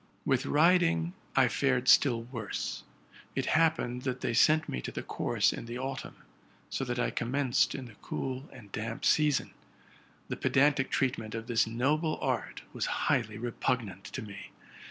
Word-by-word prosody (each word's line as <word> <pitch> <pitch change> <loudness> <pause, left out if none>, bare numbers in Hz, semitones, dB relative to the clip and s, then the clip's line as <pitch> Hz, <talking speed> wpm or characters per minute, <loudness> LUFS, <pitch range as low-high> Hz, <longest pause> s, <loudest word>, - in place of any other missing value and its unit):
With - - +1
riding 170 +1 +3 0.2
[ - - -31
fared 130 -1 +1
still 120 -3 +5
worse. 115 -4 -4 0.5
It - - 0
happened 155 -6 +2
that 130 -1 -3
they 120 - -1
sent 155 +7 +4
me 60 - -3
to - - -5
the - - -5
course - - +1
in - - -7
the 120 +1 -5
autumn, 130 0 -5 0.6
so - - -1
that 120 0 -3
I 125 - 0
commenced 130 +1 +1
in 135 - -5
the 115 - -12
cool 130 +2 -4
and 105 -6 -13
damp 115 +1 -4
season. 150 -3 +3 0.8
The - - -4
pedantic 140 0 +3
treatment 115 -5 -1
of 115 0 -4
this 115 -1 +2
noble 150 +8 0
art 125 -5 -2
was - - -2 0.2
highly 110 -4 +1
repugnant 115 -4 -2
to 130 - -6
me. 100 -1 -9
125 Hz, 160 wpm, -30 LUFS, 115-140 Hz, 0.8 s, still